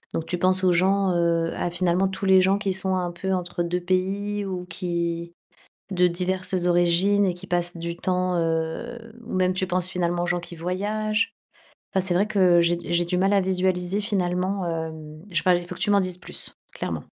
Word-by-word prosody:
donc 165 - -2
tu 180 +1 -3
penses 185 +1 +2
aux 185 - +5
gens 190 +2 +3
heu, 170 -1 +1
à - - -1
finalement 180 +2 +1
tous 190 +1 -4
les 190 -1 +6
gens 190 +2 +3
qui 200 -2 -1
sont 190 0 -1
un 180 -1 -1
peu 190 +3 -3
entre 175 -1 -2
2 175 +1 -1
pays, 195 +3 -1
ou 185 -2 -4
qui 170 -1 -3 0.6
de 180 -1 +4
diverses 185 +1 -1
origines 175 +3 +3
et 180 -2 0
qui 180 +2 -11
passent 175 -1 -1
du 170 0 -4
temps 185 0 0
heu, 165 +8 -2 0.3
ou - - -6
même 185 0 +2
tu 185 0 0
penses 180 -1 +1
finalement 175 -1 -1
aux - - 0
gens 175 0 0
qui 175 0 -9
voyagent? 210 +6 -1 0.6
Enfin 190 -1 +2
c'est 180 - +1
vrai 190 +4 +3
que 185 -5 +4
j'ai 170 0 +2
d 175 0 -6
j'ai 170 0 +2
du 180 - -1
mal 195 +2 +2
à 200 - +4
visualiser 185 +1 0
finalement, 185 -2 -1
hem 160 -2 -5
je 170 - -7
sais - - -2
pas 185 - +4
il 175 0 -1
faut 180 - -7
que - - -12
tu 205 - +2
m'en 200 -1 +5
dises 185 -1 -1
plus. - - -3 0.2
Clairement. - - -4
180 Hz, 215 wpm, -24 LUFS, 175-190 Hz, 0.6 s, les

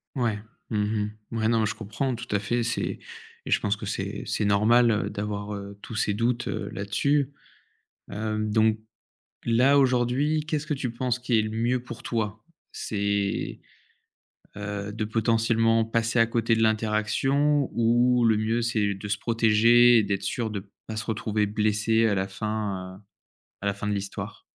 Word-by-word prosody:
Mouais. 120 -5 0 0.3
Mmh 110 - -1
mh. 105 0 -1 0.2
Mouais. 110 -1 0
Non 115 -1 +3
mais 110 - +2
je 105 - -2
comprends. 115 +5 -3
Tout 120 0 -7
à - - +3
fait, 120 +4 -1
c'est 115 0 -2 0.5
et - - -4
je - - +3
pense 105 0 0
que 105 0 -8
c'est 100 +1 -4
c'est 105 - -1
normal, 110 +4 +4
heu, 105 -1 0
d'avoir, 105 0 -4
heu, 100 0 -8
tous - - -8
ces 105 0 +1
doutes, 120 +2 0
heu, - - -3
là-dessus. 140 +8 0 0.8
Hem, 110 +1 -2
donc 110 0 +3 0.7
là 125 +5 +4
aujourd'hui, 130 +4 +2
qu'est-ce 155 -2 -2
que 150 - 0
tu 130 -3 -3
penses 125 +1 -1
qui 125 -2 +1
est - - +4
le 110 - -3
mieux 120 +3 0
pour 120 0 -8
toi? 105 -2 -3 0.3
C'est, 100 -1 -2 1.0
heu, 100 0 -4
de 110 +1 -3
potentiellement 115 +1 +2
passer 115 +1 0
à 115 - +5
côté 115 0 +1
de 115 - +1
l'interaction? 115 +7 +1
Ou 120 +1 +3
le 110 -2 +4
mieux 110 +2 0
c'est 110 -4 0
de 100 +1 -7
se 105 +1 0
protéger 115 +1 +5
et - - +4
d'être 100 -1 -2
sûr 110 +3 -2
de 100 -1 -6 0.2
pas 110 - -6
se 110 - -3
retrouver 110 -1 -1
blessé 110 +2 +2
à 105 - +2
la 95 0 -1
fin, 100 -2 -4
heu, - - -21 0.6
à - - -5
la 100 - +1
fin 100 +1 -5
de 105 - 0
l'histoire? 100 0 -5
110 Hz, 180 wpm, -26 LUFS, 105-120 Hz, 1.0 s, à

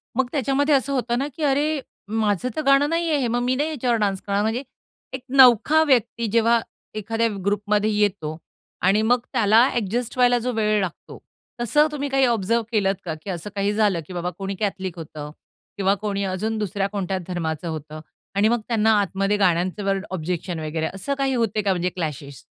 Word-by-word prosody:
मग 260 0 +1
त्याच्यामध्ये 285 +2 +2
असं 275 +1 0
होतं 240 -2 0
ना, 275 - -1
की 320 - -5
अरे, 295 +2 +1 0.3
माझं 215 +1 0
तर - - -1
गाणं 275 +1 +4
नाहीये 330 -2 +1
हे. 255 - 0
मग 240 +1 0
मी 250 +1 +1
नाही 295 +4 0
याच्यावर 250 -6 0
डान्स 195 -2 0
करणार. 200 0 -1
म्हणजे 225 +5 -1 0.5
एक 260 - -4
नवखा 265 +3 +6
व्यक्ती 240 -5 +1
जेव्हा 230 +1 +4 0.4
एखाद्या 225 +2 0 0.2
ग्रुपमध्ये 205 +1 +1
येतो 200 -7 0 0.4
आणि 195 +4 +3
मग 245 +3 +3
त्याला 225 -1 +5
अ‍ॅडजस्ट 240 +1 -2
व्हायला 245 -1 +4
जो 250 +2 -2
वेळ 215 -1 +1
लागतो, 180 -3 -6 0.4
तसं 295 +6 +3
तुम्ही 285 -1 -3
काही 270 -1 +3
ऑब्झर्व्ह 230 -1 +1
केलत 200 -3 +2
का 165 - -2
की - - -7
असं 175 +1 -4
काही 200 +1 0
झालं 205 -4 +2
की - - -9
बाबा 175 0 -2
कोणी 195 0 -4
कॅथलिक 190 -3 -3
होतं 150 -2 -8 0.5
किंवा 195 0 +2
कोणी 200 -1 -3
अजून 205 +4 -2
दुसऱ्या 200 -1 -1
कोणत्या 195 -2 -2
धर्माचं 165 -2 -3
होतं 155 -1 -6 0.4
आणि 200 +2 +4
मग 240 0 +1
त्यांना 225 -2 +2
आतमध्ये 195 +2 0
गाण्यांचे 185 +1 +1
वर्ड, 195 0 -1
ऑब्जेक्शन 175 0 -3
वगैरे 155 +1 -2
असं 195 +9 -3
काही 270 -1 0
होतंय 220 -3 0
का 200 - +2
म्हणजे 180 0 -1
क्लॅशेश? 145 -6 -6
210 Hz, 185 wpm, -23 LUFS, 190-245 Hz, 0.5 s, नवखा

